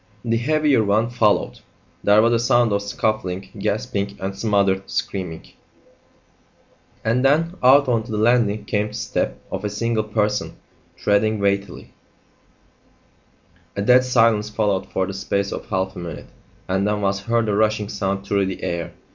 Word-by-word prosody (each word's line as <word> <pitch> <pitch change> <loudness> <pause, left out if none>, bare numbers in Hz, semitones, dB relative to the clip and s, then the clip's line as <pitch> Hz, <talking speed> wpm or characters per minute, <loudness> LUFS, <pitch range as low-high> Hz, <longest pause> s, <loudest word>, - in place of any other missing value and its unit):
The 115 0 +1
heavier 150 0 +2
one 110 +3 +1
followed. 110 -4 +1 0.4
There 105 +1 +5
was 115 +1 +3
a 115 - +2
sound 120 -2 +3
of 100 - +1
scuffling, 100 -2 -2
gasping, 100 -1 -2
and 95 0 -4
smothered 100 -2 +1
screaming; 90 -5 -4 1.6
and 120 +3 +1
then 160 +5 +3
out 135 +2 +6
on 120 -3 +2
to 120 - -9
the 105 - -2
landing 110 -2 +2
came 105 -1 0
the 105 - -11
step - - -2
of 95 +1 -4
a 105 - -1
single 110 +2 -1
person 105 -1 -1 0.4
treading 110 +2 +1
weightily. 100 -1 -2 1.8
A 100 - -2
dead 125 +4 +5
silence 115 -4 +2
followed 100 -3 -1
for 95 - -1
the 95 - -6
space 100 +1 -2
of - - -6
half 95 -1 -2
a - - -7
minute, 85 -3 -8 0.4
and 95 +2 0
then 105 0 -1
was 100 0 0
heard 115 +2 0
a 105 - 0
rushing 110 0 +1
sound 100 -1 -3
through 100 -1 +1
the 95 - -6
air. 85 -1 -3
105 Hz, 160 wpm, -21 LUFS, 100-115 Hz, 1.8 s, out